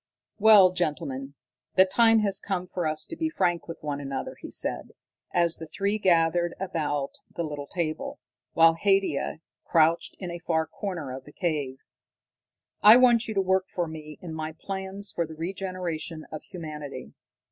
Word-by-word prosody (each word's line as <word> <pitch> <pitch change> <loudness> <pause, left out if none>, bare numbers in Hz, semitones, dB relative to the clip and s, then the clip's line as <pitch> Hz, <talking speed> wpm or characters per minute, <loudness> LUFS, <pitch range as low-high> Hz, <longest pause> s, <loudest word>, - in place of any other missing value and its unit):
"Well, 205 -4 +8
gentlemen, 140 -5 -3 0.4
the 185 - +7
time 225 +3 +4
has 200 -2 +2
come 185 -3 -3
for 175 -2 -2
us 155 0 -2
to 330 - -7
be 320 0 -1
frank 175 - 0
with 165 - -6
one 145 -1 -3
another," 135 -1 -4
he - - -7
said, - - -1 0.4
as 170 -1 +2
the 160 - -8
three 200 +5 -1
were - - -17
gathered 170 -1 +3
about 150 -7 -2 0.2
the 170 - -2
little 145 -2 -5
table, 180 - -3 0.3
while 165 0 +6
Haidia 195 -4 +1 0.2
crouched 165 0 +2
in 180 -3 -6
a 170 - -6
far 160 -2 0
corner 160 -5 -5
of 130 0 -10
the 145 - -13
cave. 150 -7 -2 1.0
"I 215 +3 +10
want 240 -2 +5
you 220 - -4
to 195 - +3
work 190 0 +1
for 175 -2 -2
me 155 -1 -9
in 170 -3 -6
my 160 0 -4
plans 195 +1 -4
for 170 -2 -2
the 160 - -9
regeneration 175 -2 -4
of 155 -1 -6
humanity. 150 - -8
170 Hz, 170 wpm, -27 LUFS, 155-195 Hz, 1.0 s, I